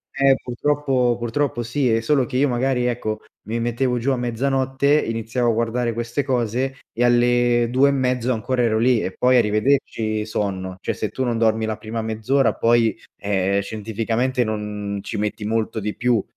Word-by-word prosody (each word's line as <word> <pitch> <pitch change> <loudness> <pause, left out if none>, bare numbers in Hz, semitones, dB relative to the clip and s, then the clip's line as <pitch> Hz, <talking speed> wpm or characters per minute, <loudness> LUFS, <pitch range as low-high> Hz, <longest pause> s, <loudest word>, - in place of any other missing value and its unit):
Eh 135 -1 +4
purtroppo 130 -1 0
purtroppo 120 +1 -1
sì 125 +3 0
è 115 0 +2
solo 135 +2 +2
che 125 - -3
io 145 - +3
magari, 125 0 0
ecco, 110 -3 -2 0.3
mi 115 +2 -2
mettevo 120 +1 0
giù 125 - -1
a 130 - 0
mezzanotte, 135 +4 +1
iniziavo 115 +1 -1
a - - 0
guardare 115 +1 -1
queste 120 +4 -2
cose 130 +1 -1
e 120 - -1
alle 120 0 +3
2 130 +3 +4
e - - +2
mezzo 130 -2 0
ancora 125 +3 -1
ero 110 -2 +2
lì 120 0 +3
e 95 - -3
poi 125 0 +4
arrivederci 110 -1 +1
sonno, 95 -3 -3
cioè - - -2
se 110 - -3
tu 130 +6 -3
non 120 -2 0
dormi 110 -1 +2
la 110 -1 -3
prima 115 +1 -5
mezz’ora 110 +4 +1
poi, 115 -1 +2 0.2
ehm, 100 -1 0
scientificamente 115 +4 -1
non 105 -2 -4
ci - - -5
metti 105 0 -3
molto 110 0 -1
di 105 0 -4
più, 120 -4 +1
120 Hz, 180 wpm, -22 LUFS, 110-130 Hz, 0.3 s, Eh